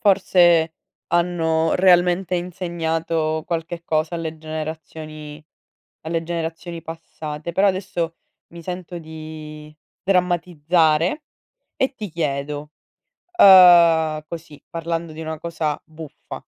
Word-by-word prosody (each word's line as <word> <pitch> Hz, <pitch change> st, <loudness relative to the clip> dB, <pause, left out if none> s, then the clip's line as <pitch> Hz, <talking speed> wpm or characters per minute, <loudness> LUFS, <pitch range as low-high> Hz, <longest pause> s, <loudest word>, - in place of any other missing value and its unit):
Forse 175 Hz, -6 st, +4 dB, 0.3 s
hanno 165 Hz, -2 st, +1 dB
realmente 180 Hz, 0 st, +3 dB
insegnato 165 Hz, -3 st, -2 dB
qualche 170 Hz, 0 st, -4 dB
cosa 155 Hz, +1 st, -1 dB
alle 160 Hz, -1 st, -4 dB
generazioni 155 Hz, -1 st, -7 dB, 0.6 s
alle 165 Hz, +1 st, -2 dB
generazioni 165 Hz, 0 st, -5 dB
passate. 160 Hz, -1 st, -7 dB
Però 195 Hz, +4 st, +3 dB
adesso 185 Hz, -3 st, -2 dB, 0.4 s
mi 170 Hz, -, -9 dB
sento 180 Hz, 0 st, -6 dB
di 155 Hz, -1 st, -10 dB, 0.3 s
sdrammatizzare 175 Hz, -, +1 dB, 0.5 s
e 265 Hz, +1 st, 0 dB
ti 215 Hz, -5 st, -6 dB
chiedo, 150 Hz, -2 st, -3 dB, 0.7 s
uhm, 170 Hz, -, +7 dB
così 165 Hz, -3 st, -9 dB
parlando 165 Hz, 0 st, -3 dB
di 160 Hz, -, -8 dB
una 160 Hz, 0 st, -4 dB
cosa 160 Hz, -2 st, -3 dB
buffa, 160 Hz, -1 st, -10 dB
165 Hz, 100 wpm, -21 LUFS, 155-175 Hz, 0.7 s, uhm